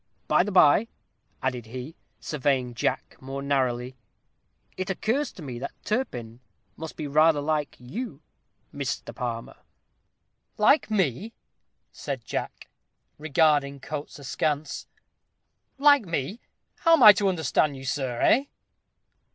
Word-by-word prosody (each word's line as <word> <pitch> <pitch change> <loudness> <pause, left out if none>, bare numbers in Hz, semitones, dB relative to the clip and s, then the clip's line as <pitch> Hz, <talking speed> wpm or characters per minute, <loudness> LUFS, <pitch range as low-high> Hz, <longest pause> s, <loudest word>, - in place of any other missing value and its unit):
By - - +4
the 205 +3 -2
by," 185 +4 +5 0.6
added 125 -3 -2
he, 130 +7 -7 0.2
surveying 135 -4 -1
Jack 115 - -2
more 135 +1 -6
narrowly, 130 -2 0 0.8
"it 185 +1 -4
occurs 230 +9 -1
to 180 - -11
me 125 -4 -6
that 140 - -5
Turpin 120 - -3 0.4
must 160 0 -8
be 155 - -5
rather 155 +2 +4
like 150 0 -1
you, 210 - -7 0.5
Mr. - - -4
Palmer?" - - -5 1.0
"Like 280 -5 +4
me," 195 - 0 0.6
said - - -6
Jack, - - -5 0.5
regarding 145 -2 +2
Coates 150 +2 -6
askance; 145 +1 -2 0.9
"like 285 -6 +5
me 165 - -3 0.4
how 330 - +4
am 320 - +6
I 210 -1 +12
to 200 -1 0
understand 155 -4 +1
you, 135 - -9
sir, 130 -3 -2
eh?" 270 +4 +4
150 Hz, 120 wpm, -26 LUFS, 130-190 Hz, 1.0 s, I